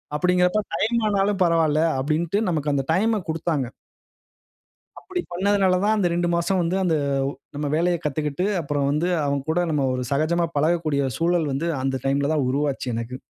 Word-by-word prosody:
அப்படிங்கிறப்ப 180 Hz, +5 st, +2 dB, 0.2 s
டைம் 235 Hz, +2 st, +1 dB
ஆனாலும் 200 Hz, 0 st, +1 dB
பரவால்ல 165 Hz, -3 st, +2 dB, 0.2 s
அப்படின்ட்டு 155 Hz, +7 st, 0 dB
நமக்கு 150 Hz, -3 st, 0 dB
அந்த 135 Hz, -1 st, 0 dB
டைம்ம 220 Hz, +4 st, +2 dB
குடுத்தாங்க. 160 Hz, -4 st, -1 dB, 1.3 s
அப்பிடி 360 Hz, -2 st, -4 dB
பண்ணதுனால 190 Hz, 0 st, +2 dB
தான் 215 Hz, +1 st, +3 dB
அந்த 185 Hz, -4 st, +2 dB
2 175 Hz, 0 st, 0 dB
மாசம் 180 Hz, +2 st, +1 dB
வந்து 170 Hz, +2 st, 0 dB
அந்த 165 Hz, -3 st, +2 dB, 0.6 s
நம்ம 150 Hz, -, -2 dB
வேலைய 175 Hz, +1 st, +2 dB
கத்துக்கிட்டு 150 Hz, +4 st, -1 dB, 0.2 s
அப்புறம் 145 Hz, -1 st, -1 dB
வந்து 155 Hz, +5 st, 0 dB, 0.2 s
அவுங்க 140 Hz, 0 st, -2 dB
கூட 175 Hz, +2 st, +1 dB
நம்ம 140 Hz, -3 st, +1 dB
ஒரு 125 Hz, -, -2 dB
சகஜமா 165 Hz, +4 st, +1 dB
பழகக்கூடிய 155 Hz, -2 st, +1 dB, 0.2 s
சூழல் 165 Hz, -2 st, +1 dB
வந்து 155 Hz, +6 st, -1 dB
அந்த 135 Hz, -1 st, -1 dB
டைம்ல 140 Hz, +2 st, +1 dB
தான் 140 Hz, -4 st, +1 dB
உருவாச்சு 140 Hz, -1 st, -1 dB
எனக்கு. 115 Hz, +2 st, -4 dB
165 Hz, 160 wpm, -23 LUFS, 145-180 Hz, 1.3 s, தான்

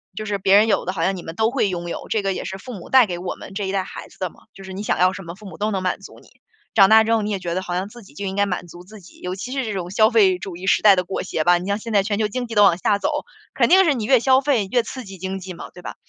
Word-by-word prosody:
就 215 Hz, -, -5 dB
是 205 Hz, -1 st, -1 dB
别 195 Hz, 0 st, +3 dB
人 210 Hz, +2 st, +6 dB
有 220 Hz, -, +1 dB
的， 185 Hz, -, -2 dB
好 165 Hz, -3 st, -2 dB
像 190 Hz, +3 st, +1 dB
你 -, -, -7 dB
们 165 Hz, 0 st, -8 dB
都 220 Hz, +3 st, +1 dB
会 255 Hz, -5 st, +1 dB
拥 175 Hz, -2 st, -4 dB
有。 -, -, -6 dB
“这 220 Hz, -, +1 dB
个 195 Hz, -1 st, -1 dB
也 -, -, -5 dB
是 190 Hz, -, -5 dB
父 245 Hz, +6 st, -9 dB
母， 190 Hz, -6 st, -10 dB
带 260 Hz, -2 st, +6 dB
给 175 Hz, -4 st, -5 dB
我 180 Hz, 0 st, -4 dB
们 190 Hz, -, -11 dB
这 200 Hz, 0 st, -3 dB
一 190 Hz, -, -3 dB
代 195 Hz, -1 st, 0 dB
孩 -, -, -9 dB
子 -, -, -20 dB
的 185 Hz, -2 st, -2 dB
嘛， -, -, -21 dB, 0.2 s
就 195 Hz, -, -13 dB
是 190 Hz, -, -9 dB
你 190 Hz, +2 st, -6 dB
想 -, -, 0 dB
要 185 Hz, +1 st, +4 dB
什 195 Hz, 0 st, -8 dB
么， 170 Hz, 0 st, -8 dB
父 210 Hz, +2 st, -15 dB
母 190 Hz, -, -10 dB
都 210 Hz, +1 st, -1 dB
能 190 Hz, -2 st, -2 dB
满 185 Hz, -, -1 dB
足 -, -, -13 dB
你。 -, -, -21 dB, 0.5 s
长 195 Hz, -3 st, +7 dB
大 220 Hz, 0 st, +7 dB
之 225 Hz, +1 st, +1 dB
后， 225 Hz, -, +2 dB
你 210 Hz, -, -3 dB
也 200 Hz, -2 st, -2 dB
觉 175 Hz, -2 st, -4 dB
得 185 Hz, -, -1 dB
好 180 Hz, -1 st, -5 dB
像 185 Hz, +2 st, -2 dB
自 240 Hz, +1 st, -13 dB
己 190 Hz, -, -18 dB
就 200 Hz, +7 st, -6 dB
应 190 Hz, 0 st, -3 dB
该 205 Hz, -, +3 dB
满 180 Hz, -2 st, -4 dB
足 175 Hz, +1 st, -12 dB
自 210 Hz, +2 st, -13 dB
己， 180 Hz, -, -17 dB
尤 180 Hz, +1 st, -4 dB
其 200 Hz, +6 st, -7 dB
是 270 Hz, 0 st, -1 dB
这 215 Hz, -, -3 dB
种 180 Hz, -2 st, -4 dB
消 215 Hz, +2 st, +4 dB
费 200 Hz, -6 st, +4 dB
主 180 Hz, -1 st, -7 dB
义 185 Hz, +2 st, -7 dB
时 -, -, +3 dB
代 205 Hz, -2 st, +7 dB
的 180 Hz, -, 0 dB
裹 185 Hz, +2 st, -4 dB
挟 155 Hz, -, -2 dB
吧。 175 Hz, +2 st, +5 dB
你 180 Hz, +2 st, -6 dB
像 200 Hz, 0 st, 0 dB
现 225 Hz, +2 st, -7 dB
在 200 Hz, -2 st, +3 dB
全 205 Hz, 0 st, -2 dB
球 215 Hz, -, +2 dB
经 245 Hz, +3 st, -4 dB
济 225 Hz, -, -7 dB
都 205 Hz, -, +6 dB
往 180 Hz, -4 st, +5 dB
下 200 Hz, +2 st, +1 dB
走， 290 Hz, -, 0 dB, 0.4 s
肯 -, -, +3 dB
定 380 Hz, +1 st, +6 dB
是 320 Hz, -5 st, +3 dB
你 230 Hz, -5 st, -3 dB
越 260 Hz, +2 st, +5 dB
消 260 Hz, +1 st, +5 dB
费 265 Hz, -7 st, +1 dB
越 245 Hz, -, +3 dB
刺 255 Hz, +3 st, -8 dB
激 195 Hz, -3 st, -10 dB
经 190 Hz, +1 st, -4 dB
济 185 Hz, 0 st, -8 dB
嘛， 170 Hz, -, -9 dB
对 180 Hz, -, -12 dB
吧？ -, -, -7 dB
195 Hz, 395 characters per minute, -21 LUFS, 185-220 Hz, 0.5 s, 长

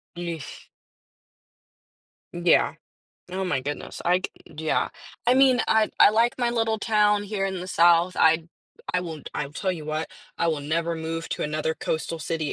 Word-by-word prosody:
Yeesh. 170 Hz, -6 st, -7 dB, 1.6 s
Yeah. 175 Hz, 0 st, +3 dB, 0.6 s
Oh 190 Hz, +1 st, -2 dB
my 180 Hz, -8 st, 0 dB
goodness, 145 Hz, +3 st, -6 dB
I 180 Hz, +1 st, +4 dB
c -, -, -14 dB, 0.3 s
yeah, 155 Hz, +1 st, 0 dB, 0.4 s
I 245 Hz, -, +5 dB
mean, 260 Hz, -2 st, +5 dB
I 220 Hz, -1 st, +3 dB
I -, -, +8 dB
like 230 Hz, +3 st, +2 dB
my 240 Hz, -1 st, +1 dB
little 225 Hz, -2 st, 0 dB
town 210 Hz, -1 st, +2 dB
here 200 Hz, -1 st, -2 dB
in 190 Hz, -1 st, -2 dB
the 180 Hz, -, -6 dB
South, 175 Hz, 0 st, +4 dB
I 160 Hz, 0 st, +4 dB, 0.5 s
I 180 Hz, -, +3 dB
won't 160 Hz, -4 st, -7 dB
I'll 140 Hz, -, -3 dB
tell 185 Hz, +4 st, -1 dB
you 160 Hz, -4 st, -7 dB
what, 155 Hz, +1 st, -3 dB, 0.3 s
I -, -, +1 dB
will 160 Hz, -3 st, 0 dB
never 165 Hz, +3 st, -1 dB
move 165 Hz, 0 st, -4 dB
to -, -, -2 dB
another 155 Hz, +1 st, -1 dB
coastal 160 Hz, +1 st, -3 dB
city 160 Hz, -1 st, -2 dB
170 Hz, 170 wpm, -25 LUFS, 160-205 Hz, 1.6 s, I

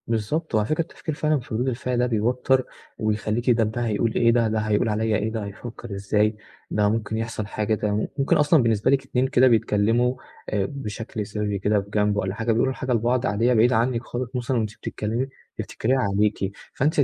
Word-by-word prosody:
بالضبط، 115 Hz, +7 st, -1 dB
وعلى 105 Hz, -1 st, +2 dB
فكرة 155 Hz, +5 st, +1 dB
التفكير 160 Hz, -1 st, -5 dB
فعلًا 155 Hz, -1 st, +1 dB
في 120 Hz, -2 st, -9 dB
ردود 120 Hz, +4 st, 0 dB
الفعل 125 Hz, 0 st, -1 dB
ده 125 Hz, -, +3 dB
بيوتر 125 Hz, +3 st, +1 dB, 0.3 s
ويخليكِ 110 Hz, +3 st, +1 dB
طب 110 Hz, -1 st, +2 dB
ده 120 Hz, -, -3 dB
هيقول 110 Hz, +1 st, 0 dB
إيه، 115 Hz, 0 st, +4 dB
ده، 115 Hz, -1 st, +3 dB
ده 110 Hz, 0 st, 0 dB
هيقول 110 Hz, +1 st, +1 dB
عليَّ 110 Hz, +1 st, +1 dB
إيه، 110 Hz, +1 st, -2 dB
ده 110 Hz, -2 st, -3 dB
هيفكر 110 Hz, +1 st, -8 dB
إزاي، 105 Hz, +2 st, +1 dB, 0.4 s
ده 105 Hz, 0 st, +2 dB
ممكن 110 Hz, 0 st, -1 dB
يحصل 115 Hz, -2 st, -3 dB
حاجة، 110 Hz, 0 st, -1 dB
ده 105 Hz, -, -2 dB
مم 105 Hz, -, -1 dB
ممكن 135 Hz, 0 st, +3 dB
أصلًا 150 Hz, -1 st, +4 dB
بالنسبة 110 Hz, -1 st, +2 dB
لِك 135 Hz, -1 st, +3 dB
اتنين 130 Hz, 0 st, +1 dB
كده 130 Hz, -1 st, +5 dB
بيتكلّموا 115 Hz, +2 st, +2 dB, 0.3 s
آآ 100 Hz, -2 st, 0 dB
بشكل 110 Hz, -4 st, -5 dB
سرِّي 105 Hz, -1 st, -2 dB
كده 105 Hz, +1 st, +2 dB
في 100 Hz, -, -14 dB
جنب 105 Hz, 0 st, +1 dB
والّا 95 Hz, -1 st, -1 dB
حاجة، 115 Hz, +1 st, 0 dB
بيقولوا 120 Hz, +4 st, +2 dB
حاجة 130 Hz, 0 st, -4 dB
لبعض 120 Hz, +2 st, +1 dB
عادية 115 Hz, +4 st, +2 dB
بعيدة 120 Hz, +2 st, +4 dB
عنِّك 120 Hz, +1 st, +1 dB
خالص 120 Hz, +1 st, -5 dB
مثلًا 125 Hz, +1 st, -1 dB
وأنتِ 110 Hz, -2 st, -2 dB
بتتكلّمي 115 Hz, +5 st, -3 dB, 0.3 s
بتفتكريها 130 Hz, +4 st, -1 dB
عليكِ، 100 Hz, -2 st, +1 dB, 0.2 s
فأنتِ 150 Hz, +3 st, +1 dB
115 Hz, 200 wpm, -24 LUFS, 105-125 Hz, 0.4 s, كده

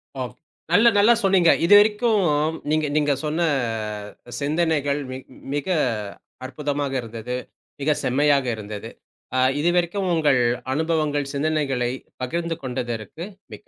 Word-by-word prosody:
ஓ, -, -, -6 dB, 0.5 s
நல்ல 230 Hz, +3 st, +6 dB
நல்ல 210 Hz, +4 st, +6 dB
சொன்னீங்க. 185 Hz, -3 st, +4 dB, 0.2 s
இதுவரைக்கும் 210 Hz, +3 st, +5 dB, 0.5 s
நீங்க 155 Hz, 0 st, +2 dB
நீங்க 145 Hz, -1 st, +2 dB
சொன்ன 155 Hz, +3 st, -1 dB, 0.9 s
ஆ, -, -, -11 dB
சிந்தனைகள் 145 Hz, -1 st, +1 dB
மி 130 Hz, -, -5 dB, 0.4 s
மிக 145 Hz, +2 st, -3 dB, 0.8 s
அற்புதமாக 140 Hz, +1 st, -3 dB
இருந்தது. 115 Hz, +1 st, -6 dB, 0.5 s
மிக 150 Hz, +2 st, +2 dB
செம்மையாக 140 Hz, +1 st, +2 dB
இருந்தது. 105 Hz, -1 st, -7 dB, 0.5 s
ஆ, -, -, +3 dB, 0.2 s
இதுவரைக்கும் 175 Hz, +4 st, +1 dB
உங்கள் 145 Hz, -6 st, +3 dB, 0.3 s
அனுபவங்கள், 155 Hz, -2 st, 0 dB
சிந்தனைகளை 140 Hz, -4 st, 0 dB, 0.3 s
பகிர்ந்து 170 Hz, +4 st, -2 dB
கொண்டதற்கு 125 Hz, -, -4 dB, 0.3 s
மிக்க -, -, -12 dB
150 Hz, 110 wpm, -23 LUFS, 135-170 Hz, 0.9 s, நல்ல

